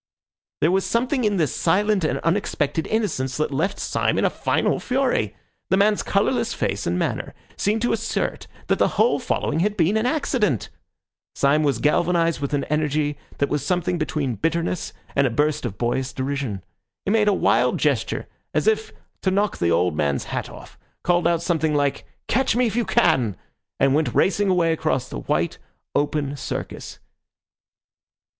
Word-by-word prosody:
There 160 - +4
was 190 +1 +2
something 250 +2 0
in 205 -2 +1
this 155 -4 0
silent 200 +3 +2
and 145 -4 +1
unexpected 160 -4 0
innocence 135 - -1
that 155 -1 0
left 190 +9 0
Syme - - 0
in - - +2
a - - +2
final - - 0
fury. 250 - 0 0.3
The 190 - +3
man's 205 +1 +3
colourless 230 +4 0
face 100 - -2
and 85 +1 0
manner - - -2 0.2
seemed 215 +3 0
to 240 - +2
assert 225 0 -2 0.2
that - - +1
the - - +1
whole 480 - +3
following - - -1
had 205 +4 0
been 185 +5 +3
an 220 +3 +1
accident. 250 - 0 0.7
Syme 140 +2 +3
was 140 -5 +1
galvanised 165 +5 +2
with 140 0 -1
an 140 - 0
energy 150 -1 0 0.2
that 140 - +1
was 145 -2 -1
something 175 +2 0
between 150 -4 -1
bitterness 165 - -1 0.2
and 140 -1 +4
a - - 0
burst 150 +5 0
of 100 - -8
boyish 125 +2 -1
derision. 130 -8 -3 0.4
He 195 - 0
made 215 -1 +3
a - - +6
wild - - +2
gesture - - 0 0.3
as - - +2
if 440 0 +1 0.3
to 190 - +1
knock 200 +1 0
the 85 - +2
old 85 0 +2
man's 70 -2 0
hat - - -4
off, - - -13 0.2
called 175 -1 +2
out 170 -1 +1
something 160 -3 +1
like 145 -1 0 0.2
"Catch 260 -1 +2
me 250 +1 +3
if 220 -2 -1
you 240 -1 +1
can," 130 - +2 0.4
and 135 0 +4
went 155 +1 +1
racing 200 +1 +3
away 170 -3 +3
across 155 -5 -1
the - - -6
white, - - -1 0.3
open 145 -1 0
Circus. 130 - -6
160 Hz, 175 wpm, -23 LUFS, 140-205 Hz, 0.7 s, a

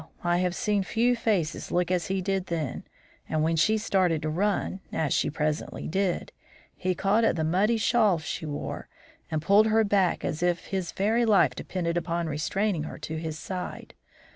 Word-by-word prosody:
I 175 0 +2
have 180 0 0
seen 210 -4 +1
few 235 +6 +2
faces 200 -9 -1
look 180 0 +1
as 180 -2 0
his 190 -1 -1
did 195 -1 -1
then, 160 -6 -3 0.4
and 155 -1 +1
when 165 +1 +2
she 215 +7 +3
started 185 -7 +1
to 155 - -1
run 195 +2 0
as 155 -3 0
she - - +1
presently 150 0 -2
did, 190 +1 -1 0.4
he 185 0 -1
caught 200 +5 +2
at 225 - +3
the 160 - -1
muddy 195 +8 +2
shawl 215 -4 +3
she 160 0 -5
wore 145 -1 -5 0.4
and 155 -1 -2
pulled 205 +4 +5
her 220 0 +4
back 200 -4 +1
as 155 - -3
if 175 0 0
his 190 -3 -3
very 220 +5 +1
life 215 -4 +4
depended 170 -2 -3
upon 170 0 -1
restraining 165 +4 -1
her 155 - -6
at - - -7
his 160 0 -4
side. 180 +2 -6
180 Hz, 185 wpm, -27 LUFS, 160-205 Hz, 0.4 s, pulled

